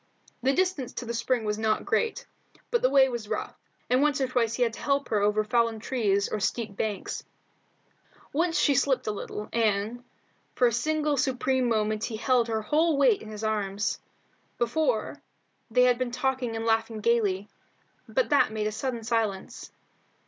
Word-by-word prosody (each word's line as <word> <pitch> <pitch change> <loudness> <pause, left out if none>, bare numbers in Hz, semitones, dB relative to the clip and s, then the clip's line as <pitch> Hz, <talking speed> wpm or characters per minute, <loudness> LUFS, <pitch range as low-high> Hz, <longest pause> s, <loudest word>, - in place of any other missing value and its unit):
The 260 +2 +3
distance 360 -5 0
to 245 - -5
the 235 - -4
spring 235 0 0
was 210 0 -2
not 220 -1 0
great, 455 - 0 0.5
but 475 - +2
the - - +4
way 270 -1 +6
was 235 -4 -5
rough, 215 - -3 0.3
and 250 +2 +3
once 295 -1 +2
or 265 - +1
twice 235 -3 0
he 250 - +2
had 230 -2 0
to - - -9
help 280 -2 0
her 215 - +2
over 210 +1 +2
fallen 230 0 +1
trees 210 -4 0
and 210 - -3
steep 210 +1 -2
banks. 205 -2 -3 1.1
Once 330 +3 +1
she 285 - +4
slipped 265 0 +1
a 215 - 0
little, 210 0 -6
and 225 +1 0 0.5
for, 250 - +3
a 235 - +3
single 300 +4 0
supreme 260 -1 +1
moment 215 -1 0
he 225 -3 -4
held 245 0 +2
her 220 -1 -2
whole 310 +5 +2
weight 415 - +4
in 215 - -9
his 215 0 -7
arms. 205 -2 -1 0.6
Before, 275 - 0 0.5
they 250 +2 +4
had 250 -1 +3
been 255 -1 -1
talking 250 -1 -1
and 225 0 -3
laughing 225 -1 0
gaily, 205 -4 +1 0.6
but - - +1
that 285 -6 +4
made 215 -1 -2
a 215 - 0
sudden 235 +1 -3
silence. 220 -4 -2
235 Hz, 180 wpm, -27 LUFS, 215-265 Hz, 1.1 s, way